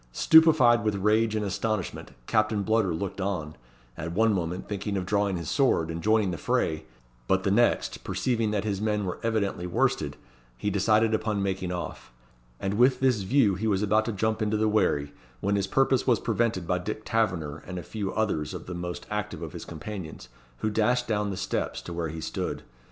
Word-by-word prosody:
Stupefied 140 - +6
with 105 -1 +1
rage 110 +2 +2
and 105 -1 -1
astonishment, 105 0 -2 0.2
Captain 110 - +1
Bludder 110 -2 +2
looked 95 +4 -3
on; 90 -6 -3 0.4
at 85 +5 -5
one 110 +3 +3
moment 90 -1 -3
thinking 100 0 -3
of 90 - -2
drawing 100 -1 +1
his 85 -2 -6
sword, 85 - +2
and 85 0 -5
joining 110 -2 +2
the 85 - -5
fray; 80 +1 0 0.4
but 95 0 +2
the 100 - +1
next, 120 +4 +2
perceiving 115 -4 0
that 105 -1 -1
his 100 -2 -2
men 105 -1 0
were 90 - -4
evidently 100 -6 -1
worsted, 90 - 0 0.4
he 105 +11 -1
decided 110 +3 +3
upon 110 -2 0
making 95 -2 -2
off; 85 -8 -6 0.5
and 100 +2 -2
with 125 +1 +5
this 130 -5 +2
view 110 +1 +3
he 105 +5 -2
was 100 -1 +1
about 105 +1 +2
to 115 - -1
jump 110 +2 -1
into 110 0 +1
the 110 +1 +2
wherry, 90 -9 +1 0.3
when 100 +1 0
his 100 -1 0
purpose 135 +4 +2
was 120 -5 +4
prevented 115 -5 0
by 90 +1 0
Dick 105 +4 -5
Taverner, 85 -10 0
and 90 0 -5
a 90 - -5
few 105 -3 -4
others 80 -10 -1
of - - -7
the 90 - -6
most 90 0 -5
active - - -3
of - - -7
his - - -7
companions, 80 - -7 0.3
who 110 - 0
dashed 120 +4 +1
down 105 -2 0
the 95 - -4
steps - - -2
to 85 - -7
where 85 -1 -2
he 80 +1 -6
stood. - - -4
100 Hz, 200 wpm, -27 LUFS, 90-110 Hz, 0.5 s, Stupefied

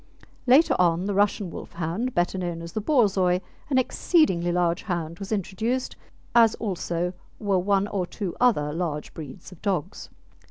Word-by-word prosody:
Later 270 +7 +6
on 175 0 +3
the 200 - -1
Russian 200 -2 +1
Wolfhound, 175 +11 -4
better 175 +2 +1
known 170 -2 -3
as 170 - -7
the 215 - -2
Borzoi, 200 -8 +3 0.3
an 265 - +2
exceedingly 250 - +2
large 175 0 +1
hound, 170 -5 -4
was 195 +1 -7
introduced, 220 +5 -2 0.4
as 230 -2 +6
also 180 -4 -2 0.2
were 200 -3 +1
one 200 +2 +2
or 190 -4 -2
two 185 -3 -5
other 150 -13 +3
large 160 -3 -3
breeds 150 +3 -9
of 180 - -14
dogs. 190 -3 -2
185 Hz, 155 wpm, -25 LUFS, 170-215 Hz, 0.4 s, Later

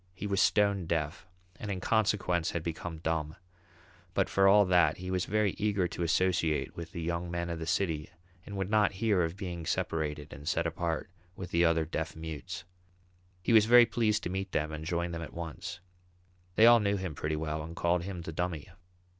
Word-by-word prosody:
He 105 - -6
was 100 -1 +1
stone 100 -4 +3
deaf, 80 +1 -2 0.3
and 105 - -6
in 95 -2 -2
consequence 100 -5 +1
had 85 - -3
become 85 0 -5
dumb; 80 -1 -2 0.8
but 95 - +2
for 95 0 +4
all 100 +1 +7
that 90 -1 +4
he 90 +1 -5
was 90 -1 0
very 105 -1 +1
eager 100 -3 +1
to 85 - -6
associate 85 -2 +1
with 85 -1 -7
the 85 - -5
young 85 +1 -2
men 85 0 -3
of 85 - -4
the 80 - -5
city 80 -3 0 0.3
and 100 +1 -7
would 95 +1 -2
not 105 -2 +3
hear 100 -1 +2
of 85 +2 -2
being 90 -4 -5
separated 75 -2 -2
and 70 +2 -10
set - - 0
apart 85 0 -2 0.2
with 90 -3 -7
the 85 +1 +3
other 80 -1 +3
deaf - - -4
mutes. 80 +2 -6 0.8
He 115 - +2
was 110 -2 +7
very 120 0 +8
pleased 110 -2 +1
to 90 - -3
meet 95 0 -4
them 75 +1 0
and 80 0 -6
joined 85 +1 -1
them 85 - -4
at 80 - -8
once. 85 0 -6 0.7
They 110 - +7
all 120 0 +8
knew 100 -1 +1
him 95 -4 -4
pretty 75 +1 -2
well 75 0 -3
and 80 +2 -8
called 85 +1 +1
him 90 -1 -6
the 80 - -6
"Dummy." 85 -1 -3
85 Hz, 205 wpm, -30 LUFS, 80-100 Hz, 0.8 s, very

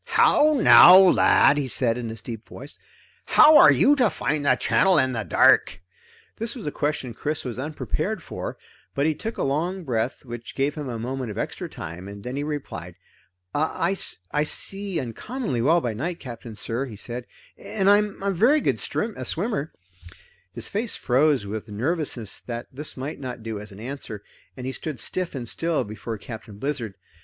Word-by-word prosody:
"How 305 +1 +5
now, 180 -5 +9
lad," 180 -5 +5
he 140 - -2
said 120 -2 0
in 120 -1 -4
his 110 0 -9
deep 115 -2 -7
voice, 140 +4 -9 0.5
"how 310 0 +7
are - - +9
you 290 - +5
to 245 -5 +4
find 150 -2 -2
the 130 - +5
channel 185 +7 +3
in 130 -3 +3
the 115 -3 -2
dark?" 90 - +4 0.6
This 230 +4 -4
was 240 - -8
a 150 - -2
question 145 -5 -2
Chris 150 +6 -3
was 125 -1 -5
unprepared 140 -4 -3
for, - - -6 0.4
but 140 - +1
he 160 - +2
took 225 +9 -6
a - - -1
long 170 +7 -1
breath 125 -1 -2
which 120 -1 -8
gave 140 +2 0
him 150 -4 -6
a 120 - -4
moment 125 +1 -4
of 105 - -7
extra - - -4
time, 85 +4 -8
and 100 0 -9
then 130 +4 -4
replied. 130 - -6 0.6
"I 170 +5 0 0.4
I 150 - +1
see 195 +4 -2
uncommonly 130 - -4
well 165 +7 +3
by 120 -5 -2
night, 165 +10 -4
Captain 120 -3 -9
sir," 115 +5 -3
he 115 - -9
said, 120 +4 -7 0.3
"and 195 -2 -3
I'm 205 -1 +3
a 200 - +1
very 235 - +4 0.2
strong 210 - -3
swimmer." 165 - -2 0.8
His 115 +3 -7
face 215 +2 -1
froze 135 -2 +2
with 110 +2 -5
nervousness 120 - -2
that 120 -1 -6
this 145 +2 -2
might 140 +5 -5
not 125 -4 -6
do 110 -2 -4
as 105 +1 -9
an 100 - -12
answer, 115 -4 -7 0.3
and 125 - -6
he 130 - -2
stood 145 -1 -5
stiff 180 +7 -3
and 125 -3 -5
still 165 +6 -1
before 110 +2 -6
Captain 110 -1 -10
Blizzard. 120 -5 -3
135 Hz, 185 wpm, -24 LUFS, 115-165 Hz, 0.8 s, now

